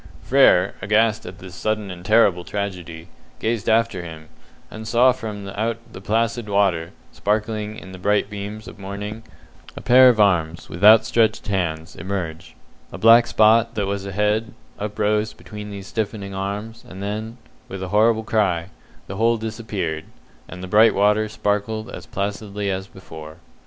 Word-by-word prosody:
Frere, - - +4
aghast 110 0 +1
at 90 +1 -9
this 95 -2 -11
sudden 105 0 -2
and 90 -1 -9
terrible 100 -3 +3
tragedy, 90 -5 -5 0.3
gazed 115 -2 -1
after 110 -4 +2
him, 80 -2 -10 0.4
and 110 0 -8
saw 125 +3 +5
from 105 -5 -6
out 110 +3 -2 0.2
the 95 - -9
placid 115 +1 -1
water, 95 -5 +1 0.2
sparkling 105 0 -2
in 95 - -10
the 95 - -10
bright 105 +2 +1
beams 105 +1 -7
of - - -11
morning, 100 +3 -6 0.6
a - - -6
pair 130 +1 +7
of 115 -3 +2
arms, 85 -5 +1
with 85 - -8
outstretched 110 +1 +5
hands, 85 -3 -2
emerge; 85 -3 -5 0.4
a - - -7
black 115 +1 +6
spot, 115 +2 +4
that 105 - 0
was 100 0 -3
a 100 - -6
head, 105 +3 0 0.2
uprose 105 +1 -1
between 105 -1 -9
these 100 -1 -8
stiffening 100 -2 -4
arms, 100 +4 -5
and 95 +1 -8
then, 110 +3 -4 0.3
with 95 -1 -6
a 95 - -5
horrible 110 +2 +3
cry, 95 -6 0 0.4
the 95 - -7
whole 115 +2 +3
disappeared, 110 -8 -4 0.4
and 90 0 -9
the - - -5
bright 110 +3 +5
water 105 +2 +2
sparkled 110 +2 -2
as - - -9
placidly 100 -1 -3
as 95 0 -4
before. 80 -5 -11
105 Hz, 160 wpm, -22 LUFS, 95-110 Hz, 0.6 s, pair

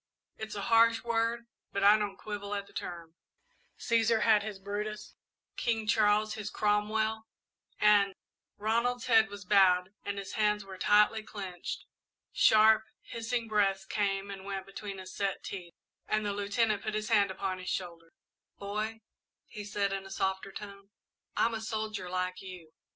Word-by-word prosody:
It's 220 -1 -6
a 200 - -3
harsh 230 0 +4
word, 235 0 0 0.3
but 200 - -1
I 205 +1 +8
don't 205 -2 -2
quibble 205 -1 -5
at 200 0 -3
the - - -20
term. 170 -2 -6 0.6
'Cæsar 230 -1 +2
had 215 -2 +5
his 210 -1 -5
Brutus, 205 +2 -5 0.4
King 225 -2 0
Charles 215 0 +3
his 210 -1 -5
Cromwell, 215 +2 0 0.5
and 205 -2 +5 0.2
'" - - -60
Ronald's 235 +3 0
head 225 -4 +5
was 205 -1 -9
bowed 185 -1 +4
and 200 0 -4
his 195 -1 -5
hands 210 -1 +1
were 190 -1 -10
tightly 210 +1 +4
clenched. 190 -5 -6 0.5
Sharp, 220 0 +6 0.2
hissing 230 0 -3
breaths 195 -3 +1
came 200 0 -1
and 195 -1 -8
went 195 -1 -4
between 195 0 -7
his 185 -1 -9
set 200 -1 -2
teeth 175 -3 -7 0.3
and 215 0 0
the 205 - -1
Lieutenant 205 +1 0
put 215 0 -3
his 215 +1 -2
hand 205 -3 +4
upon 190 0 -3
his 185 - -5
shoulder. 170 -2 -5 0.5
"Boy," 215 +2 -4 0.4
he 210 -2 -8
said, 200 -1 -1
in 195 0 -4
a - - -12
softer 190 0 -2
tone, 200 -1 -10 0.5
"I'm 230 - +3
a 220 - -3
soldier, 215 -4 -3
like 185 0 -2
you. 180 -4 -10
205 Hz, 160 wpm, -31 LUFS, 195-220 Hz, 0.6 s, I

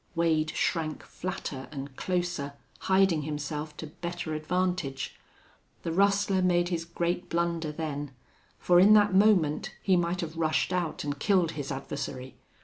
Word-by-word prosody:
Wade 160 -2 +2
shrank 155 -3 -1
flatter 165 -7 -5
and 140 -2 -7
closer, 175 -6 -2 0.3
hiding 190 -4 +3
himself 150 0 -4
to - - -6
better 170 +1 -5
advantage. 175 -3 -1 0.7
The 165 - -2
rustler 195 +1 +3
made 175 -1 +2
his 165 -2 -2
great 170 +1 -2
blunder 170 -2 0
then, 150 -2 -4 0.5
for 175 -1 +4
in 200 +4 +8
that 205 -2 +5
moment 190 -7 +3
he 190 - +3
might 175 +1 0
have 165 -1 -5
rushed 160 +2 +1
out 175 -3 -1
and 145 -1 -3
killed 185 -5 +3
his 145 -3 -5
adversary. 135 -1 -5
170 Hz, 140 wpm, -28 LUFS, 150-180 Hz, 0.7 s, in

